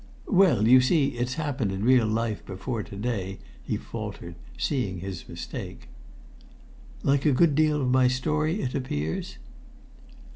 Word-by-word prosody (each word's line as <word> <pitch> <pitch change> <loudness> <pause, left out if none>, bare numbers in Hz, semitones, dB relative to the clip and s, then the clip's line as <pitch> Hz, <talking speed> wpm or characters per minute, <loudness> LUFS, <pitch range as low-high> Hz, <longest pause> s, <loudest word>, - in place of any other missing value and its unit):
"Well, 180 - +4
you 130 +2 +8
see, 140 +2 +3
it's 120 +1 -3
happened 140 -9 -2
in 95 +1 -3
real 125 -3 +5
life 110 -1 -1
before 110 +5 -4
to 100 - -10
day," 100 -3 -3 0.2
he - - -2
faltered, 85 - -7 0.2
seeing 115 -10 -1
his 95 -1 -7
mistake. - - -7 1.1
"Like 140 0 +2
a 150 - +4
good 150 +4 +4
deal 150 0 +2
of 125 - +1
my 130 0 +5
story, 155 +8 0
it 125 - -2
appears?" 80 - -3
125 Hz, 145 wpm, -26 LUFS, 105-145 Hz, 1.1 s, you